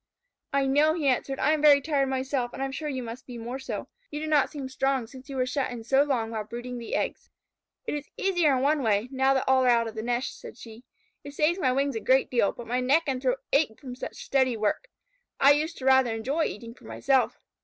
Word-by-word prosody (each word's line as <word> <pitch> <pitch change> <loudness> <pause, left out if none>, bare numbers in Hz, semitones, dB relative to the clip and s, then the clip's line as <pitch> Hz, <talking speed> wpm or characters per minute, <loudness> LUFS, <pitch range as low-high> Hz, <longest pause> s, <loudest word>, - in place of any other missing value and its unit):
"I 275 -1 +2
know," 295 +4 +3
he 310 -5 -1
answered. 270 +1 0
"I 305 - +2
am 310 -1 +1
very 295 -2 +7
tired 280 -2 0
myself, 260 -2 -2
and - - -6
I - - +1
am 270 - -4
sure 300 +2 -4
you 260 -3 -3
must 235 +3 -8
be 245 -2 -8
more 240 +3 -5
so. 265 - -5 0.2
You 295 - -5
do 310 - -4
not 300 -3 +3
seem 280 -4 -6
strong 265 -1 0
since 260 +4 -13
you 275 - -6
were 255 -1 +1
shut 265 +1 -1
in 240 -2 -7
so 265 +4 +3
long 250 -6 0
while 220 -2 -3
brooding 240 +3 -7
the 230 - -4
eggs." - - -3 0.6
"It - - -3
is 295 -1 -5
easier 350 -7 +2
in 255 - -1
one 295 +1 +2
way, 220 0 +1
now 265 0 +2
that 265 - +1
all 265 0 +4
are - - +2
out 235 -1 +3
of 225 - -6
the 220 - -4
nest," 240 +2 -2
said - - -11
she. 230 +1 -12 0.4
"It 285 0 -10
saves 320 +5 +2
my 260 -7 +2
wings 275 0 0
a - - -1
great 260 +3 +2
deal, 235 -5 +2
but 240 - -10
my 245 +2 -1
neck 275 +6 +3
and 265 -3 -2
throat 260 0 0
ache 275 -7 +2
from 255 -3 -8
such 250 - -7
steady 260 -3 +2
work. 215 - -1 0.5
I 275 - +7
used 310 +3 0
to 260 - -7
rather 265 -3 +4
enjoy 275 +9 -1
eating 230 +2 -6
for - - -19
myself. 270 -2 +1
265 Hz, 255 wpm, -27 LUFS, 245-285 Hz, 0.6 s, very